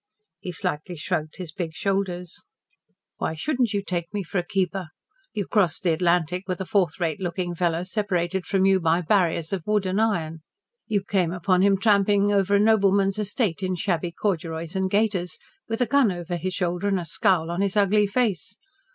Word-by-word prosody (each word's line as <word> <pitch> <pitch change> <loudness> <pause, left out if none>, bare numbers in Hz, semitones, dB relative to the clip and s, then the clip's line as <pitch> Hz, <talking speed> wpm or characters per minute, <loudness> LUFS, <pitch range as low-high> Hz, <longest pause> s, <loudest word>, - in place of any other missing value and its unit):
He 180 - -6
slightly 165 +1 -3
shrugged 155 -1 -3
his 180 -4 -6
big 165 -2 -5
shoulders. 185 -3 -2 0.7
"Why 160 - -2
shouldn't 250 - 0
you 200 -1 -1
take 175 -3 -3
me 205 -1 -3
for 180 +2 -2
a - - -2
keeper? 190 -1 -1 0.4
You 205 -2 -3
crossed 195 -5 +1
the 170 -3 +3
Atlantic 175 +2 +1
with 185 -2 -2
a 190 - -3
fourth 190 -2 +1
rate 165 -4 -1
looking 175 0 -2
fellow 170 0 0
separated 190 -2 -1
from 190 -1 +2
you 195 -1 +4
by 165 0 +2
barriers 170 -2 +1
of 190 - -1
wood 210 -2 +1
and 190 +3 +1
iron. 165 -8 0 0.5
You 205 -3 0
came 185 -4 0
upon 185 +1 +1
him 195 0 +4
tramping 205 0 +3
over 200 0 +3
a - - +4
nobleman's 200 -2 +3
estate 205 -3 -1
in 185 -1 -1
shabby 175 -1 -1
corduroys 165 -3 -3
and 190 0 0
gaiters, 190 -5 0 0.3
with 225 +1 -3
a - - +4
gun 250 -2 +3
over 175 -1 -4
his 185 +2 -3
shoulder 180 +1 -1
and 195 -2 +1
a 175 - -5
scowl 165 +1 +1
on 175 +3 -1
his 200 +1 0
ugly 205 +1 +4
face. 205 - -1
185 Hz, 190 wpm, -24 LUFS, 175-200 Hz, 0.7 s, you